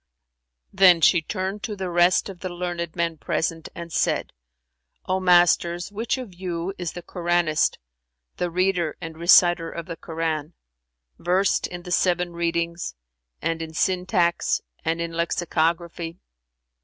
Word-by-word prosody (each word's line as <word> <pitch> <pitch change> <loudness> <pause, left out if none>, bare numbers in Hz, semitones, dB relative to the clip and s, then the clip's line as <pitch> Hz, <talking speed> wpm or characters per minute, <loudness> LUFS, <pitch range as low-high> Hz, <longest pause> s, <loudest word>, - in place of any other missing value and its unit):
Then 190 -3 +7
she 175 +2 +5
turned 190 +4 -4
to 210 -1 -4
the 190 -2 -4
rest 175 +1 +4
of 190 -3 -9
the 185 - -4
learned 175 -2 -4
men 170 -2 -1
present 160 +1 -2
and 170 -1 -8
said, - - 0 0.7
"O 185 0 0
masters, 175 0 +3
which 225 +5 -1
of 245 -7 -7
you 175 0 -4
is 175 -2 -3
the 175 - -8
Koranist, 175 -3 +1 0.6
the 175 - -1
reader 180 -2 0
and 165 -2 -7
reciter 175 0 +5
of 170 0 -6
the 165 - -6
Koran, 160 -1 -3 0.6
versed 185 +3 +1
in 175 0 -8
the 180 - -8
seven 175 0 +1
readings 170 - -2 0.5
and 165 0 -1
in 160 -1 -7
syntax 180 -1 +1 0.2
and 165 +1 -1
in 170 0 -3
lexicography?" 170 0 -1
175 Hz, 140 wpm, -24 LUFS, 165-180 Hz, 0.7 s, Then